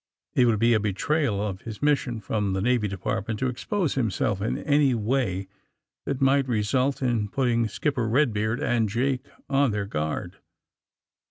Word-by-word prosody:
It 125 Hz, -, +4 dB
would 115 Hz, -2 st, +3 dB
be 115 Hz, +3 st, +4 dB
a 110 Hz, -, +4 dB
betrayal 105 Hz, +4 st, 0 dB
of 95 Hz, -2 st, -5 dB
his 110 Hz, -2 st, -7 dB
mission 140 Hz, -5 st, +1 dB
from 105 Hz, -1 st, -1 dB
the 95 Hz, -, 0 dB
Na^^ 115 Hz, 0 st, +1 dB
Department 100 Hz, +3 st, -3 dB
to 130 Hz, -, 0 dB
expose 155 Hz, -, -1 dB
himself 105 Hz, -5 st, 0 dB
in 110 Hz, -, -1 dB
any 145 Hz, -3 st, +2 dB
way 105 Hz, -4 st, -1 dB, 0.6 s
that 140 Hz, -2 st, -2 dB
might 135 Hz, 0 st, +3 dB
result 125 Hz, +4 st, 0 dB
in 115 Hz, -5 st, 0 dB
putting 120 Hz, -2 st, +1 dB
Skipper 125 Hz, -, -1 dB
Eedbeard 115 Hz, -3 st, +1 dB
and 115 Hz, -3 st, +1 dB
Jake 130 Hz, +4 st, -1 dB, 0.2 s
on 140 Hz, -1 st, +3 dB
their 105 Hz, -2 st, -2 dB
guard. 75 Hz, -5 st, -3 dB
115 Hz, 160 wpm, -26 LUFS, 105-135 Hz, 0.6 s, It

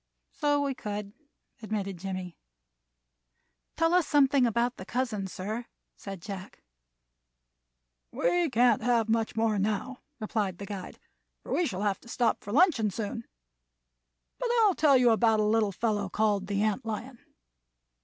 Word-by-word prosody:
"So 290 Hz, -1 st, +1 dB
we 280 Hz, -1 st, -1 dB
could," 210 Hz, -5 st, -5 dB, 0.5 s
admitted 200 Hz, -4 st, -3 dB
Jimmie. 185 Hz, -2 st, -5 dB, 1.4 s
"Tell 330 Hz, +1 st, +2 dB
us 360 Hz, -3 st, +3 dB
something 275 Hz, -3 st, +4 dB
about 235 Hz, +2 st, 0 dB
the -, -, -7 dB
cousins, 215 Hz, -4 st, -2 dB
sir," 215 Hz, +6 st, -5 dB, 0.3 s
said 195 Hz, -4 st, -8 dB
Jack. 195 Hz, -2 st, -8 dB, 1.5 s
"We 350 Hz, -2 st, +1 dB
can't 245 Hz, 0 st, +3 dB
have 230 Hz, -1 st, +2 dB
much 225 Hz, 0 st, 0 dB
more 220 Hz, -2 st, +1 dB
now," 215 Hz, +6 st, -2 dB, 0.2 s
replied 210 Hz, -4 st, -2 dB
the 200 Hz, -, -7 dB
guide, 195 Hz, -3 st, -7 dB, 0.5 s
"for -, -, -5 dB
we 350 Hz, -, +2 dB
shall 195 Hz, -2 st, -3 dB
have 200 Hz, -2 st, 0 dB
to 235 Hz, -, -16 dB
stop 235 Hz, 0 st, 0 dB
for 205 Hz, -, -7 dB
luncheon 275 Hz, -, +4 dB
soon. 220 Hz, +3 st, -5 dB, 1.1 s
But -, -, -1 dB
I'll 410 Hz, -3 st, +5 dB
tell 290 Hz, -5 st, +5 dB
you 245 Hz, -2 st, +5 dB
about 225 Hz, -1 st, +3 dB
a -, -, +3 dB
little 215 Hz, -1 st, +2 dB
fellow 205 Hz, -1 st, -1 dB
called 205 Hz, -1 st, +1 dB
the 200 Hz, 0 st, 0 dB
ant 215 Hz, -2 st, 0 dB
lion. 230 Hz, +3 st, -6 dB
220 Hz, 145 wpm, -28 LUFS, 200-250 Hz, 1.5 s, I'll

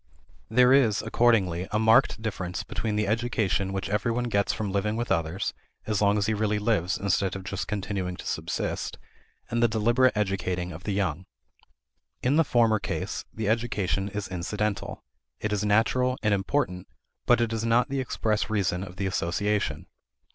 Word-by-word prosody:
There 125 Hz, +3 st, +5 dB
is, 120 Hz, -7 st, +4 dB
accordingly, 105 Hz, -6 st, +2 dB
a 105 Hz, -, +1 dB
marked 110 Hz, 0 st, +4 dB
difference 95 Hz, -3 st, -3 dB
between 105 Hz, +2 st, -3 dB
the 105 Hz, 0 st, +1 dB
education 110 Hz, -3 st, 0 dB
which 95 Hz, 0 st, -3 dB
every 105 Hz, +4 st, 0 dB
one 120 Hz, +1 st, -1 dB
gets 100 Hz, 0 st, +2 dB
from 105 Hz, -3 st, -3 dB
living 105 Hz, +2 st, 0 dB
with 120 Hz, -1 st, -3 dB
others, 85 Hz, 0 st, -1 dB, 0.3 s
as 105 Hz, -2 st, 0 dB
long 100 Hz, 0 st, +4 dB
as 100 Hz, -, +1 dB
he 110 Hz, -, +1 dB
really 105 Hz, 0 st, 0 dB
lives 105 Hz, -4 st, +1 dB
instead 95 Hz, -1 st, 0 dB
of 95 Hz, -, -6 dB
just 100 Hz, 0 st, -4 dB
continuing 95 Hz, -3 st, -3 dB
to -, -, -10 dB
subsist, -, -, -3 dB, 0.5 s
and 115 Hz, 0 st, +1 dB
the 120 Hz, -, +5 dB
deliberate 120 Hz, +3 st, +2 dB
educating 90 Hz, -3 st, -1 dB
of 85 Hz, +2 st, -10 dB
the 105 Hz, -, -1 dB
young. 95 Hz, -3 st, -1 dB, 1.0 s
In 130 Hz, +3 st, +3 dB
the 165 Hz, -, +5 dB
former 115 Hz, -6 st, +3 dB
case -, -, -4 dB
the 110 Hz, -2 st, -4 dB
education 105 Hz, -4 st, 0 dB
is 105 Hz, -1 st, -4 dB
incidental; 100 Hz, +3 st, -3 dB, 0.4 s
it 105 Hz, 0 st, -2 dB
is 105 Hz, 0 st, 0 dB
natural 125 Hz, +5 st, +2 dB
and 105 Hz, -1 st, +3 dB
important, 95 Hz, -2 st, -1 dB, 0.4 s
but -, -, +5 dB
it 115 Hz, -1 st, 0 dB
is 115 Hz, 0 st, -2 dB
not 115 Hz, +4 st, +3 dB
the 135 Hz, 0 st, -1 dB
express 110 Hz, -4 st, -1 dB
reason 95 Hz, -4 st, 0 dB
of 90 Hz, -2 st, -9 dB
the 95 Hz, 0 st, -3 dB
association. 100 Hz, +3 st, -1 dB
105 Hz, 175 wpm, -27 LUFS, 95-115 Hz, 1.0 s, There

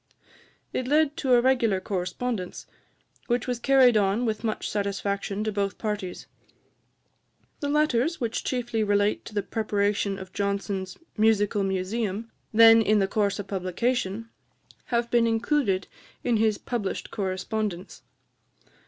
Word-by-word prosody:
It 255 Hz, -, -2 dB
led 300 Hz, +1 st, +3 dB
to 265 Hz, -5 st, +1 dB
a 240 Hz, -, +6 dB
regular 240 Hz, -6 st, +2 dB
correspondence, 185 Hz, +2 st, -3 dB, 0.6 s
which 240 Hz, -1 st, 0 dB
was 245 Hz, -2 st, -2 dB
carried 260 Hz, -2 st, +5 dB
on 205 Hz, +3 st, +2 dB
with 220 Hz, -1 st, -2 dB
much 220 Hz, -2 st, -2 dB
satisfaction 200 Hz, 0 st, -2 dB
to 215 Hz, -, -1 dB
both 200 Hz, -2 st, -2 dB
parties. 210 Hz, -4 st, -4 dB, 1.3 s
The 285 Hz, -, -2 dB
letters, 300 Hz, +1 st, +1 dB
which 230 Hz, -3 st, -2 dB
chiefly 240 Hz, -3 st, -1 dB
relate 205 Hz, 0 st, +1 dB
to 215 Hz, -, -10 dB
the 205 Hz, -, 0 dB
preparation 205 Hz, -2 st, 0 dB
of 190 Hz, -1 st, -10 dB
Johnson's 200 Hz, -1 st, -2 dB, 0.2 s
Musical 210 Hz, -2 st, +3 dB
Museum, 195 Hz, +3 st, -2 dB, 0.2 s
then 225 Hz, 0 st, +8 dB
in 215 Hz, -1 st, +3 dB
the 195 Hz, -1 st, +2 dB
course 200 Hz, -1 st, 0 dB
of 205 Hz, -, -5 dB
publication, 200 Hz, +3 st, -2 dB, 0.6 s
have 235 Hz, -1 st, -1 dB
been 235 Hz, -1 st, +4 dB
included 225 Hz, -4 st, +1 dB, 0.4 s
in 240 Hz, -2 st, +2 dB
his 215 Hz, -1 st, +2 dB
published 230 Hz, -6 st, -4 dB
correspondence. 195 Hz, -1 st, -3 dB
215 Hz, 130 wpm, -26 LUFS, 200-235 Hz, 1.3 s, then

